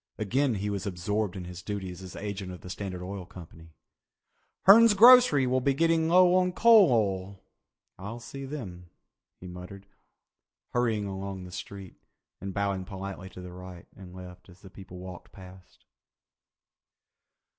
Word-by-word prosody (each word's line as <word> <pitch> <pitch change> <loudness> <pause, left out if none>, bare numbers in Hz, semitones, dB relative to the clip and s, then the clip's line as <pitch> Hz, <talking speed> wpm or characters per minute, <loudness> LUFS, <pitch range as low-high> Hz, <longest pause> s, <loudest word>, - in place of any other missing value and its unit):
Again 120 +5 0
he 105 +1 -3
was 100 0 -4
absorbed 100 +2 -2
in 95 - -6
his 90 0 -9
duties 95 -2 -6
as 95 -1 -10
agent 100 -2 -6
of 90 - -10
the 90 - -9
Standard 95 -2 -6
Oil 95 +1 -6
Company. 80 -2 -14 0.9
"Hern's 220 +2 +7
Grocery 235 - +7
will 130 +1 0
be 135 +1 +1
getting 165 +1 +2
low 180 +1 +5
on 180 0 +2
coal 220 - +6
oil. 100 -3 -1 0.6
I'll 105 +5 -7
see 135 +4 -9
them," 95 - -8 0.5
he - - -12
muttered, 90 +2 -10 0.8
hurrying 115 -4 0
along 95 -1 -6
the 90 - -11
street, 95 0 -9 0.4
and 95 +1 -6
bowing 100 -1 -2
politely 95 0 -8
to 95 - -11
the 90 -1 -10
right 90 -1 -11
and 90 -2 -13
left 90 0 -12
at 90 - -16
the 95 - -13
people 95 -2 -12
walking 90 -1 -11
past. 95 -1 -15
100 Hz, 155 wpm, -27 LUFS, 90-120 Hz, 0.9 s, Hern's